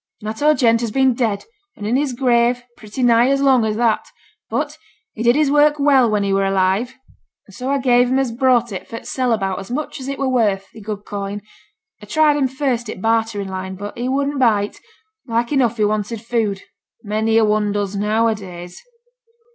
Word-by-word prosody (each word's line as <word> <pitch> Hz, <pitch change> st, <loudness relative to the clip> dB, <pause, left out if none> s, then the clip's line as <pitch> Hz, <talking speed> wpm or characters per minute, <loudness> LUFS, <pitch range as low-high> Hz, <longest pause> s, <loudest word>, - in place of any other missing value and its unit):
Natteau 255 Hz, +9 st, +1 dB
Gent 230 Hz, -4 st, +3 dB
has 235 Hz, -, -1 dB
been 265 Hz, +3 st, +2 dB
dead 225 Hz, -4 st, -1 dB, 0.3 s
and 205 Hz, -, -7 dB
in 225 Hz, +4 st, 0 dB
his 275 Hz, -1 st, 0 dB
grave 240 Hz, -1 st, +2 dB
pretty 215 Hz, +4 st, -6 dB
nigh 240 Hz, +1 st, +4 dB
as 275 Hz, 0 st, +2 dB
long 265 Hz, -4 st, +4 dB
as 215 Hz, -1 st, -1 dB
that. 230 Hz, -1 st, +1 dB, 0.4 s
But -, -, -2 dB, 0.4 s
he 225 Hz, -, -7 dB
did 240 Hz, +1 st, +4 dB
his 295 Hz, -2 st, +2 dB
work 295 Hz, 0 st, +4 dB
well 275 Hz, -4 st, +4 dB
when 210 Hz, -1 st, +1 dB
he 195 Hz, -1 st, 0 dB
were 195 Hz, 0 st, +2 dB
alive; 195 Hz, +6 st, +1 dB, 0.5 s
and 200 Hz, -, -18 dB
so 250 Hz, +7 st, -5 dB
I 280 Hz, -, +2 dB
gave 245 Hz, -2 st, +3 dB
him 260 Hz, -, +2 dB
as 270 Hz, -3 st, 0 dB
brought 240 Hz, -1 st, +2 dB
it 190 Hz, -, -6 dB
for 230 Hz, -, -7 dB
t' -, -, -11 dB
sell 255 Hz, -2 st, -1 dB
about 195 Hz, -4 st, -1 dB
as 195 Hz, -, -9 dB
much 290 Hz, +4 st, -4 dB
as 260 Hz, -, -7 dB
it 275 Hz, 0 st, -3 dB
were 275 Hz, -, -1 dB
worth, 210 Hz, -7 st, +1 dB
i' -, -, -10 dB
good 210 Hz, -1 st, -6 dB
coin. 200 Hz, 0 st, -5 dB, 0.6 s
A -, -, -12 dB
tried 310 Hz, -2 st, +3 dB
him 280 Hz, -2 st, +1 dB
first 255 Hz, -3 st, -2 dB
i' -, -, -3 dB
t' -, -, -13 dB
bartering 225 Hz, -2 st, 0 dB
line, 190 Hz, 0 st, -5 dB
but 205 Hz, +2 st, -7 dB
he 245 Hz, +2 st, -3 dB
wouldn't 280 Hz, +1 st, -1 dB
bite; 210 Hz, -5 st, +1 dB, 0.5 s
like 235 Hz, +2 st, -1 dB
enough 245 Hz, -5 st, +1 dB
he 210 Hz, -, +2 dB
wanted 215 Hz, +1 st, -2 dB
food, 220 Hz, -5 st, -1 dB, 0.4 s
many 220 Hz, +1 st, 0 dB
a 225 Hz, -, +5 dB
one 210 Hz, -1 st, +1 dB
does 200 Hz, -1 st, -2 dB
now 215 Hz, +3 st, +1 dB
a 225 Hz, -, +2 dB
days.' 180 Hz, -4 st, -10 dB
230 Hz, 215 wpm, -19 LUFS, 205-260 Hz, 0.6 s, a